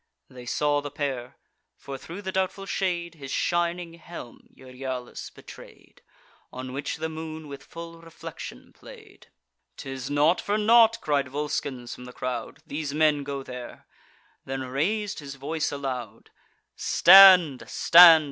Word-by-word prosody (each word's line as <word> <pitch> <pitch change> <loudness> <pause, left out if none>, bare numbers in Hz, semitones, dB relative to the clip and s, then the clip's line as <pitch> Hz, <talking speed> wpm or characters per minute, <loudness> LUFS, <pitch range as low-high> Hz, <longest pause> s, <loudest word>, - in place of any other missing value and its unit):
They 125 -1 -11
saw 145 +2 +1
the 145 - -6
pair; 135 -3 -4 0.4
for, 140 - -8
thro' 170 +8 -9
the 190 -2 -4
doubtful 190 +1 -2
shade, 175 -3 -2
His 140 -4 -10
shining 175 +2 -1
helm 170 -7 -11
Euryalus 130 -1 -7
betray'd, - - -15 0.5
On 130 0 -7
which 140 +1 -4
the 160 +1 -3
moon 160 -1 -7
with 140 -1 -9
full 165 0 -10
reflection 165 - -10
play'd. - - -15 0.5
"'Tis 135 -1 -6
not 150 +4 +2
for 205 +1 -1
naught," 230 +1 +5
cried 145 -3 0
Volscens 135 -3 -4
from 125 - -11
the 125 - -11
crowd, 125 0 -5
"These 145 -1 -5
men 150 -2 +2
go 140 -1 -5
there;" 125 -2 -9 0.6
then 135 0 -5
rais'd 185 +11 -2
his 140 -2 -8
voice 155 +3 -3
aloud: 135 -4 -6 0.4
"Stand! 180 -7 +7
stand! 170 -1 +8
145 Hz, 140 wpm, -26 LUFS, 135-170 Hz, 0.6 s, stand